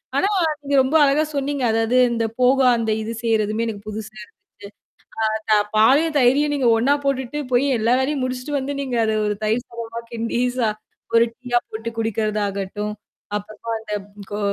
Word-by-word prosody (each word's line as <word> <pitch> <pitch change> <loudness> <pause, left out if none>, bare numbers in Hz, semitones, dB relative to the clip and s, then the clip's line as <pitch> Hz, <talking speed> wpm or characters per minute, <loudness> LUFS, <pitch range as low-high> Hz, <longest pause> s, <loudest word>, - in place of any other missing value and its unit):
ஆனா - - +3 0.3
நீங்க 285 0 -1
ரொம்ப 265 +4 0
அழகா 285 +2 +3
சொன்னீங்க. 280 -1 -1
அதாவது 225 +2 +1
இந்த 230 -1 0
போவா 255 +1 +4
அந்த 225 -1 -1
இது 220 +1 -4
செய்றதுமே 220 0 +1
எனக்கு 205 -2 -6
புதுசா 215 +1 -6
இருந்துச்சு. 230 - -15 1.0
அ 215 - -10
த - - +7 0.2
பாலையும், 290 +8 +4
தயிரையும் 280 +4 +3
நீங்க 265 -4 +2
ஒண்ணா 255 +6 +3
போட்டுட்டு, 275 +1 -1
போய் 250 +3 +3
எல்லா 230 +3 +2
வேலையும் 275 +1 -1
முடிச்சுட்டு 255 +3 -3
வந்து 275 +1 -3
நீங்க 260 -3 -2
அத 220 0 0
ஒரு 210 0 -1
தயிர் 225 +3 0
சாதமா 230 0 -6
கிண்டி 230 +1 -2 0.2
சா 225 -3 +2 0.5
ஒரு 230 - +6
டீயா 245 -1 0
போட்டு 225 +1 -5
குடிக்கிறதாகட்டும், 210 -2 -2 0.4
அப்புறமா 215 +2 -7
அந்த 220 -1 -8 0.4
கோ 205 - -3
235 Hz, 165 wpm, -21 LUFS, 220-265 Hz, 1.0 s, த